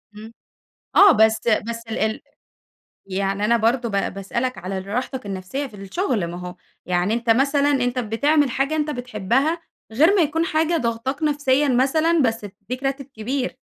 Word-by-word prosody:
امم، 220 +2 -11 0.6
آه، 400 -2 +8
بس 220 -1 +3
بس 230 +1 0
ال 220 0 -2 0.9
يعني 195 +1 -1
أنا 235 +2 +3
برضو 235 +1 +1
با 200 -1 0
باسألك 235 +7 -3
على 190 +1 -5
ال 190 +1 -7
راحتك 250 +3 -3
النفسية 200 +9 -4
في 215 - -14
الشغل، 205 - -2
ما 175 +1 -6
هو 180 0 -7 0.3
يعني 180 +3 0
أنتَ 235 0 -2
مثلًا 280 +4 +3
أنتَ 250 -2 0
بتعمل 280 +6 +2
حاجة 275 +5 -1
أنتَ 300 -1 -1
بتحبها 250 - -1 0.3
غير 315 - +4
ما 370 - +4
يكون 325 +2 +1
حاجة 320 +1 +1
ضاغطاك 255 +4 -2
نفسيًا 290 -1 +2
مثلًا، 310 +6 +2
بس 225 -3 -1
بتدِّيك 250 +6 -8
راتب 270 0 -2
كبير. 255 +1 -4
245 Hz, 160 wpm, -22 LUFS, 215-285 Hz, 0.9 s, آه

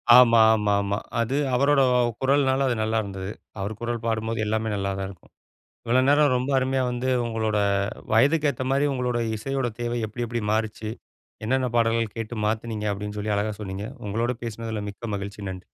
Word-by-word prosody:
ஆமா 115 -2 +7
ஆமா 105 -2 +1
ஆமா. 100 0 -1 0.2
அது 130 +5 0 0.2
அவரோட 140 +2 +4 0.4
குரல்னால 135 0 +3
அது 120 - +1
நல்லா 110 +1 0
இருந்தது. 95 0 -5 0.3
அவரு 100 +3 -3
குரல் 120 -1 -3
பாடும்போது 110 0 -1
எல்லாமே 110 +1 -1
நல்லாதான் 95 -1 -2
இருக்கும். 95 -4 -15 0.5
இவ்வளோ 125 +2 +3
நேரம் 145 -2 +5
ரொம்ப 130 +3 -2
அருமயா 130 0 +1
வந்து 125 +2 -2 0.2
உங்களோட 110 -2 -1 0.6
வயதுக்கு 145 +6 +4
ஏத்த 130 - -5
மாரி, 140 +2 +3
உங்களோட 125 -2 -1 0.2
இசையோட 135 +2 -2
தேவை 120 0 -1
எப்டி, 120 +3 -4
எப்டி 120 0 -2
மாறிச்சு? 110 0 -1 0.6
என்னான்னா 130 +1 +1
பாடல்கள் 115 -2 +1
கேட்டு 115 +1 -5
மாத்துனீங்க! 110 -1 -2
அப்படின்னு 105 +1 -6
சொல்லி 105 0 -1
அழகா 105 +1 -1
சொன்னீங்க. 100 0 -5 0.2
உங்களோட 115 +4 0
பேசுனதுல 110 -1 -4
மிக்க 105 +1 -6
மகிழ்ச்சி. 100 +1 -6
நன்றி. 95 0 -8
115 Hz, 165 wpm, -25 LUFS, 105-125 Hz, 0.6 s, ஆமா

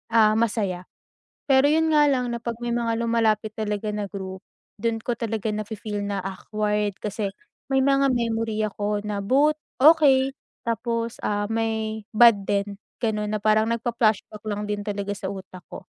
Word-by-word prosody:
ah, 215 -1 +6
masaya. 200 -6 -1 0.6
Pero 270 +1 +6
'yun 320 +1 +3
nga 295 -1 +5
lang 250 -3 0
na 235 - -3
'pag 235 -1 -3
may 240 - -1
mga 235 -1 0
lumalapit 220 -2 +1
talaga 210 -1 -2
na 210 -1 -3
group, 190 -1 -6 0.4
dun 230 0 +1
ko 245 - -1
talaga 225 -2 -2
na 215 0 -2
fe-feel 210 -1 -5
na 200 -1 -2
awkward, 210 +2 -2
kasi 210 -1 -2 0.4
may 270 -1 +3
mga 275 0 +3
memory 225 -2 -1
ako 205 0 -2
na 205 -1 -2
both 280 +9 +3 0.2
okey 280 -3 +6 0.3
tapos, 230 0 -2
ah, 205 0 0
may 220 -1 -1
bad 230 -3 +7
din 200 0 -1 0.2
gano'n 210 -2 0
na - - +1
parang 215 0 +3
nagfla-flashback 230 -2 0
lang 210 0 -2
din 205 0 -2
talaga 200 0 -2
sa 190 - -5
utak 190 -2 -9
ko. - - -9
220 Hz, 165 wpm, -24 LUFS, 205-235 Hz, 0.6 s, bad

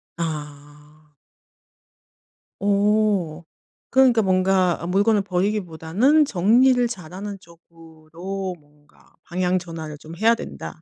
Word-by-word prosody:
아. 150 -1 -8 1.4
오. 200 -4 +1 0.5
그러니까 255 -4 +4
뭔가 185 -2 +2
아 170 - -5
물건을 205 +3 +2
버리기보다는 195 - +1
정리를 245 +5 +3
잘 180 -8 -9
하는 200 +1 -6
쪽으로 170 +2 -9
뭔가 145 0 -27
방향 180 +1 -1
전환을 160 -3 -8
좀 160 +2 -11
해야 225 +3 +4
된다. 160 - -9
180 Hz, 215 characters per minute, -22 LUFS, 160-205 Hz, 1.4 s, 그러니까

